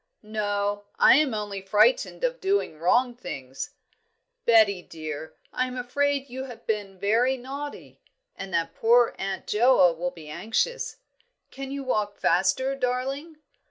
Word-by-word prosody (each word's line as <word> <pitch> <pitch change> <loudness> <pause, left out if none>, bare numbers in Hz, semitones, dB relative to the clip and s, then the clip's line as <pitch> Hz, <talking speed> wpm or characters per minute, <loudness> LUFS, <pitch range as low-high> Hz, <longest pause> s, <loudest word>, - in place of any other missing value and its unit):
"No; 205 -1 -2
I - - +7
am 285 -6 +2
only 205 -2 -4
frightened 220 - +2
of - - 0
doing 385 - 0
wrong 240 +9 +2
things, 135 - -7 0.7
Betty 215 -5 +5
dear. 155 -2 -7 0.2
I 255 0 0
am 255 0 -6
afraid 280 +2 0
you 260 +1 -6
have 245 -3 -11
been 205 -3 -2
very 235 +7 +2
naughty, 280 +3 -8 0.3
and 195 - -7
that 170 -2 -1
poor 235 +1 +4
Aunt 195 0 -3
Joa 215 -6 +5
will 175 +2 -2
be 165 -3 -13
anxious. 225 - -2 0.5
Can 270 0 -7
you 280 0 -4
walk 210 -5 -1
faster, 190 +10 +2
darling?" 270 +5 -2
225 Hz, 140 wpm, -26 LUFS, 195-265 Hz, 0.7 s, I